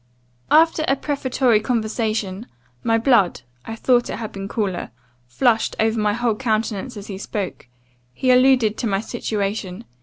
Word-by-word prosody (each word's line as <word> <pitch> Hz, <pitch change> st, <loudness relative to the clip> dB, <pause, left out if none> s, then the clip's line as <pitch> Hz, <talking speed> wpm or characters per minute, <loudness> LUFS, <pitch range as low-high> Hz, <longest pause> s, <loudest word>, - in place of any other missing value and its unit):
"After 320 Hz, 0 st, +4 dB
a 270 Hz, -, +3 dB
prefatory 260 Hz, -5 st, +1 dB
conversation, 220 Hz, -2 st, -2 dB, 0.4 s
my 225 Hz, 0 st, +2 dB
blood 225 Hz, -, +3 dB, 0.2 s
(I 225 Hz, -, -5 dB
thought 240 Hz, +1 st, +2 dB
it -, -, -3 dB
had 220 Hz, -2 st, -6 dB
been 195 Hz, 0 st, -6 dB
cooler) 200 Hz, -5 st, -2 dB, 0.4 s
flushed 225 Hz, -, +1 dB
over 220 Hz, 0 st, +1 dB
my 210 Hz, -1 st, +1 dB
whole 235 Hz, 0 st, 0 dB
countenance 220 Hz, 0 st, -2 dB
as 200 Hz, -, -8 dB
he 195 Hz, -2 st, -7 dB
spoke 200 Hz, -, -5 dB, 0.4 s
he 255 Hz, -, +1 dB
alluded 250 Hz, -4 st, +4 dB
to 235 Hz, -, -1 dB
my 195 Hz, -2 st, 0 dB
situation. 205 Hz, -2 st, -3 dB
225 Hz, 150 wpm, -21 LUFS, 205-245 Hz, 0.4 s, After